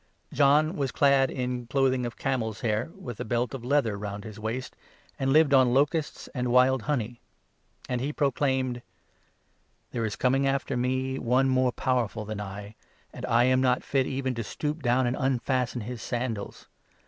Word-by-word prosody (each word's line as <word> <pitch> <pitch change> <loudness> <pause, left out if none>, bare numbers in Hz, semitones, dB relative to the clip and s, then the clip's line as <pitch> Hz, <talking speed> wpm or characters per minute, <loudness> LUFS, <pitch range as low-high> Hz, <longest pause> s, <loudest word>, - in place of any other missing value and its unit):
John 150 +4 +4
was 135 -4 -1
clad 135 +1 +4
in 125 -2 -3
clothing 130 -1 +1
of 120 - -9
camels' 115 -5 -2
hair, 110 +3 0
with 125 - -8
a - - -2
belt 120 +3 -1
of 130 -3 -6
leather 135 -3 +2
6 100 - -6
round 100 0 -5
his 110 -1 -9
waist, 115 +4 -4 0.4
and 135 0 +1
lived 155 -1 +5
on 130 -2 +5
locusts 150 +3 0
and 125 -2 -1
wild 125 +1 +4
honey; 120 -5 -2 0.7
and 125 -1 -2
he 135 - -1
7 150 - -5
proclaimed 130 -3 0 0.5
— - - -42
"There 115 - -2
is 110 -3 -2
coming 135 +2 +2
after 135 0 -1
me 130 +2 -1
one 130 +3 +2
more 130 -1 +2
powerful 120 -5 -1
than 105 0 -5
I, 100 +1 -7 0.4
and - - -6
I 120 +1 +4
am 130 +1 +3
not 125 -1 +2
fit 135 -2 +1
even 130 -1 -2
to 115 -1 -3
stoop 150 +8 -4
down 125 0 +2
and 120 +1 0
unfasten 130 -2 0
his 120 +2 -6
sandals. 120 -5 -4
125 Hz, 185 wpm, -27 LUFS, 120-135 Hz, 0.7 s, lived